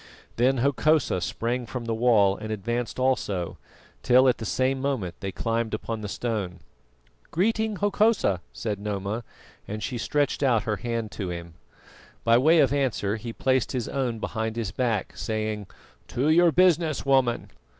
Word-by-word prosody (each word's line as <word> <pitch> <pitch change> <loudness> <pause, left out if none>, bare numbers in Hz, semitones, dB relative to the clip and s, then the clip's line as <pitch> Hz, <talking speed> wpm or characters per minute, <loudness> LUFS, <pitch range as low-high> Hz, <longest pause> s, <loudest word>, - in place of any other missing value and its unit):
Then 130 +3 +3
Hokosa 140 - +2
sprang 120 +6 -2
from 120 +4 -5
the 115 - -1
wall 110 -4 +4
and 110 +1 -6
advanced 120 +3 -3
also, 105 -9 -1 0.4
till 130 +2 +5
at 125 - +2
the 110 - -4
same 130 +7 0
moment 130 -11 -1
they 95 0 -4
climbed 115 +1 -1
upon 110 0 -5
the 105 - -4
stone. 105 -6 -3 0.7
"Greeting, 220 +4 +1
Hokosa," 205 - +2
said 105 -3 -4
Noma, 105 +2 -3 0.4
and 105 +1 -5
she 125 -3 -3
stretched 145 +3 0
out 120 -6 +3
her 105 -2 -1
hand 115 -2 -3
to 95 -4 -4
him. 85 -1 -6 0.7
By 115 +1 +5
way 160 +6 +5
of 140 -1 +3
answer 120 -7 0
he 115 +1 -6
placed 130 +1 0
his 125 -3 -2
own 125 -4 -1
behind 110 0 -3
his 115 -5 -3
back, 115 -5 -1
saying: 110 -2 -3 0.4
"To 135 +5 0
your 170 +1 +5
business, 165 -5 +3
woman." 130 -3 +2
115 Hz, 160 wpm, -26 LUFS, 105-135 Hz, 0.7 s, till